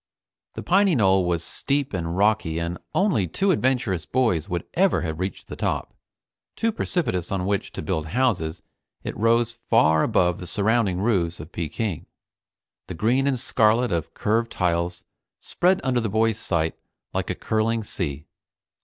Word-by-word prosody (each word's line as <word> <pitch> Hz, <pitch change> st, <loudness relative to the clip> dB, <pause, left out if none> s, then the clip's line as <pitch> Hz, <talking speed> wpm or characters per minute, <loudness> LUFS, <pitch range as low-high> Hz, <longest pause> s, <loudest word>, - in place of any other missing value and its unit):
The -, -, -5 dB
piny 195 Hz, -1 st, +3 dB
knoll 95 Hz, -5 st, +3 dB
was 85 Hz, -1 st, 0 dB
steep 140 Hz, +5 st, -1 dB
and 85 Hz, -1 st, -2 dB
rocky 100 Hz, -5 st, +2 dB
and 85 Hz, +1 st, -3 dB, 0.2 s
only 185 Hz, -, +2 dB
two 195 Hz, -, +1 dB
adventurous 125 Hz, -, 0 dB
boys 110 Hz, -8 st, 0 dB
would 85 Hz, -1 st, -2 dB
ever 190 Hz, +1 st, +3 dB
have 80 Hz, -1 st, -4 dB
reached 95 Hz, +1 st, -4 dB
the -, -, -7 dB
top. -, -, -2 dB, 0.6 s
Too 230 Hz, -, +1 dB
precipitous 150 Hz, -, -2 dB
on 95 Hz, -2 st, -1 dB
which 100 Hz, 0 st, -1 dB
to -, -, -5 dB
build 80 Hz, 0 st, -2 dB
houses, 95 Hz, -7 st, 0 dB, 0.4 s
it -, -, -4 dB
rose 115 Hz, +1 st, +2 dB, 0.2 s
far 80 Hz, -9 st, +5 dB
above 90 Hz, -2 st, +2 dB
the 90 Hz, -, -7 dB
surrounding 100 Hz, -1 st, +1 dB
roofs 90 Hz, -6 st, +1 dB
of 75 Hz, +4 st, -9 dB
Peking. 85 Hz, +2 st, -3 dB, 0.8 s
The 90 Hz, -, -6 dB
green 120 Hz, +10 st, +2 dB
and 130 Hz, -3 st, +1 dB
scarlet 115 Hz, 0 st, +2 dB
of 85 Hz, -3 st, -2 dB
curved 115 Hz, +2 st, 0 dB
tiles 85 Hz, -1 st, -1 dB, 0.4 s
spread 185 Hz, +2 st, +1 dB
under 125 Hz, -2 st, +1 dB
the 110 Hz, -2 st, -1 dB
boys' 110 Hz, +1 st, +1 dB
sight 80 Hz, -3 st, -1 dB, 0.3 s
like -, -, -2 dB
a -, -, -1 dB
curling 110 Hz, +1 st, 0 dB
sea. 75 Hz, -8 st, -4 dB
100 Hz, 160 wpm, -24 LUFS, 85-120 Hz, 0.8 s, far